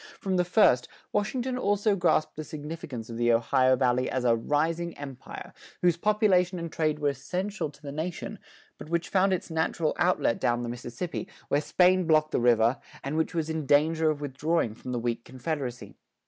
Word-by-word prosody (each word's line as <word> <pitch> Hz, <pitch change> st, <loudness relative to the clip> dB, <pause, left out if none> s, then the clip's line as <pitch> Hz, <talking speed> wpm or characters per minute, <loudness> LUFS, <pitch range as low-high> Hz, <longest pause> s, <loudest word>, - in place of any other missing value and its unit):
From 190 Hz, -2 st, -1 dB
the 180 Hz, -, +3 dB
first, 175 Hz, -, +4 dB, 0.3 s
Washington 250 Hz, +4 st, -1 dB
also 205 Hz, -1 st, +2 dB
grasped 175 Hz, -4 st, +1 dB
the 155 Hz, -, -5 dB
significance 150 Hz, -6 st, -7 dB
of 115 Hz, -, -7 dB
the 120 Hz, 0 st, +3 dB
Ohio 130 Hz, +3 st, +3 dB
Valley 125 Hz, 0 st, +1 dB
as 130 Hz, -, -1 dB
a 115 Hz, -1 st, +5 dB
"rising 160 Hz, +8 st, -1 dB
empire," 135 Hz, -3 st, -9 dB, 0.3 s
whose 175 Hz, -2 st, +4 dB
population 185 Hz, -2 st, +2 dB
and 170 Hz, -1 st, -5 dB
trade 155 Hz, -1 st, 0 dB
were 145 Hz, -1 st, +1 dB
essential 180 Hz, -, -3 dB
to 145 Hz, -, -18 dB
the 140 Hz, -, -6 dB
nation, 160 Hz, +4 st, -5 dB, 0.4 s
but -, -, -9 dB
which 170 Hz, 0 st, -1 dB
found 195 Hz, 0 st, +3 dB
its 180 Hz, -2 st, -2 dB
natural 160 Hz, 0 st, 0 dB
outlet 175 Hz, -9 st, +2 dB
down 120 Hz, 0 st, +1 dB
the 120 Hz, -, -4 dB
Mississippi, 120 Hz, +10 st, -5 dB, 0.2 s
where 145 Hz, -, +2 dB
Spain 180 Hz, +3 st, +3 dB
blocked 155 Hz, -1 st, +3 dB
the -, -, +1 dB
river, 120 Hz, +1 st, +4 dB, 0.2 s
and 140 Hz, +3 st, -3 dB
which 160 Hz, +2 st, -1 dB
was 160 Hz, -2 st, 0 dB
in 160 Hz, -3 st, -3 dB
danger 155 Hz, +3 st, +3 dB
of 150 Hz, -1 st, -2 dB
withdrawing 145 Hz, -2 st, 0 dB
from 125 Hz, +3 st, -8 dB
the 125 Hz, -, -1 dB
weak 115 Hz, 0 st, -2 dB
confederacy. 130 Hz, -1 st, -5 dB
155 Hz, 185 wpm, -28 LUFS, 130-175 Hz, 0.4 s, a